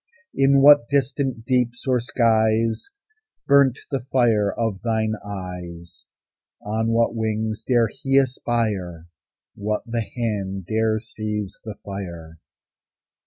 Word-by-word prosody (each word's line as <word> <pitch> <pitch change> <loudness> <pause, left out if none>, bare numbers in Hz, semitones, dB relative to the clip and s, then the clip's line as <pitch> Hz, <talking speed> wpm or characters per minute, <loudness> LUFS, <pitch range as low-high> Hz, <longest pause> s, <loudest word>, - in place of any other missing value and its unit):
In 135 0 +4
what 145 -4 +7
distant 135 -3 -1
deeps 125 -1 0
or 130 -1 +3
skies 115 - +1 0.6
Burnt 140 -3 +4
the 135 - 0
fire 110 -6 +3
of 110 -5 -2
thine 110 -2 0
eyes? 90 -4 -8 0.6
On 110 +2 -1
what 115 0 +2
wings 110 -1 -2
dare 120 -3 +3
he 135 +5 -1
aspire? 110 -10 -1 0.5
What 105 +1 -3
the 115 -1 -2
hand 100 -5 -3
dare 110 +1 +1
seize 105 -2 -5
the 110 -2 -7
fire? 85 -5 -7
110 Hz, 115 wpm, -23 LUFS, 100-125 Hz, 0.6 s, what